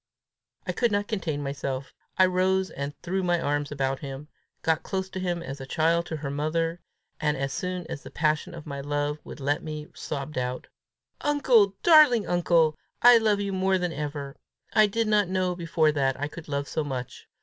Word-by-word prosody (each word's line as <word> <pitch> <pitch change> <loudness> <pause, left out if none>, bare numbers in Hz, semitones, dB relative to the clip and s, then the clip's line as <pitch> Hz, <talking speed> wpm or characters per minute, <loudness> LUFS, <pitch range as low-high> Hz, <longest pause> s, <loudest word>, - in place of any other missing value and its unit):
I - - -1
could 240 -2 +1
not 205 0 0
contain 165 -9 -2
myself. 140 -1 -4 0.2
I 185 - +7
rose 185 +1 +1
and 140 +1 -5
threw 190 +2 -1
my 175 -1 +1
arms 145 -1 -1
about 135 -2 -1
him, 140 +1 -7 0.3
got 160 -1 +2
close 190 -1 -3
to 190 - -4
him 175 -2 -2
as 135 -2 -7
a 135 - -7
child 170 +3 +1
to 160 - -4
her 145 -2 -4
mother, 165 +4 -1 0.4
and, 150 -1 +1
as 135 0 -2
soon 180 -1 -3
as 145 - -6
the - - -10
passion 155 +3 0
of 165 - -9
my 140 -2 -5
love 145 +1 -2
would - - -10
let 145 +2 0
me, 155 -1 -6
sobbed 140 -1 -4
out, 125 0 -3 0.6
"Uncle! 250 -9 +4
darling 300 - +7
uncle! 165 -3 +2 0.2
I 240 -1 +9
love 210 -2 +2
you 200 -1 -2
more 190 0 +2
than 180 -2 -2
ever! 145 -1 -5 0.4
I 215 -1 +6
did 225 +2 0
not 210 -3 +3
know 185 -1 0
before 165 -2 +2
that 135 -3 0
I 145 - -1
could 160 +2 -10
love 140 -1 -2
so 155 - -1
much! 130 -4 -6
160 Hz, 195 wpm, -26 LUFS, 145-190 Hz, 0.6 s, I